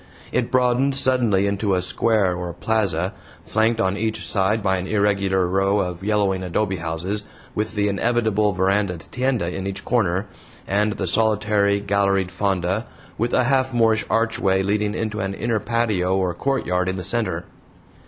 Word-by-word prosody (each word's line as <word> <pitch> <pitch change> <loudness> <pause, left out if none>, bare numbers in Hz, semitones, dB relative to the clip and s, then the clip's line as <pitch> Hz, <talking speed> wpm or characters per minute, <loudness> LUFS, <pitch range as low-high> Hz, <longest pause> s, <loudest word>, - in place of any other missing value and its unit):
It 120 -1 0
broadened 130 +2 +2
suddenly 120 -8 +3
into 100 0 0
a 90 - 0
square 100 -1 +1
or 90 -1 -4
plaza, 95 -2 0 0.3
flanked 110 +1 +1
on 95 -3 +1
each 110 +1 -2
side 105 +2 +1
by 95 -1 +2
an 90 +1 -4
irregular 100 -3 +1
row 95 +2 +1
of 90 -2 -2
yellowing 100 -3 +1
adobe 95 +2 -1
houses, 85 +5 -3 0.3
with 110 +1 -3
the 105 0 +1
inevitable 105 0 +1
verandaed 95 -2 0
tienda 125 -9 -1
in 95 0 -4
each 100 0 -5
corner, 100 -5 +1 0.4
and 105 +2 +1
the - - -3
solitary, 105 -2 +2
galleried 100 -2 +1
fonda, 95 +2 -1 0.3
with 120 +2 0
a - - +3
half 130 0 +1
Moorish 115 -2 +3
archway 100 -4 +1
leading 105 +1 0
into 110 -1 -3
an 95 -1 -2
inner 115 0 -1
patio 105 -5 0
or 90 -2 0
courtyard 90 -6 -1
in 95 - -2
the 90 - -5
center. 90 -4 -1
100 Hz, 160 wpm, -22 LUFS, 95-110 Hz, 0.4 s, suddenly